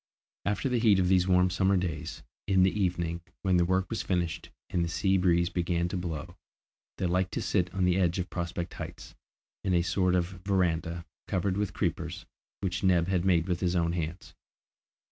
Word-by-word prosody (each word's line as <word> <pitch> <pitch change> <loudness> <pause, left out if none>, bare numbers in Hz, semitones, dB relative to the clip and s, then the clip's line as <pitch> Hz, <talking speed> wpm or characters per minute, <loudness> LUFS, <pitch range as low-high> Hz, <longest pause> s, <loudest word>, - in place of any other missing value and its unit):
After 105 +6 0
the 125 -2 +1
heat 110 -4 +5
of 90 -1 +2
these 90 -1 +4
warm 90 0 +4
summer 95 +1 +2
days, 85 -3 -4 0.2
in 95 -2 +4
the 95 - +4
evening 85 -4 -1 0.2
when 95 -2 +3
their 85 -1 +3
work 95 +1 +1
was 115 - -3
finished 85 -3 -2 0.2
and 85 - +1
the 85 - -2
sea 95 +3 +1
breeze 85 -2 +3
began 85 -1 0
to - - -4
blow, 85 -4 -5 0.6
they - - -1
liked 90 +1 0
to - - -1
sit 90 -3 +1
on 95 -1 0
the 90 +1 +3
edge 85 -1 +2
of 90 -1 -3
Prospect 85 0 -3
Heights, - - -8 0.5
in 95 -2 +1
a 85 - +3
sort 90 0 +2
of 90 +1 -2
verandah, 85 -3 0 0.2
covered 95 +1 0
with 100 -2 -1
creepers, 85 0 -2 0.4
which 90 -2 -2
Neb 90 -2 +3
had 90 -3 +1
made 85 -3 +3
with 90 -1 0
his 90 -1 0
own 85 -1 +2
hands. 85 +1 -4
90 Hz, 195 wpm, -29 LUFS, 85-95 Hz, 0.6 s, heat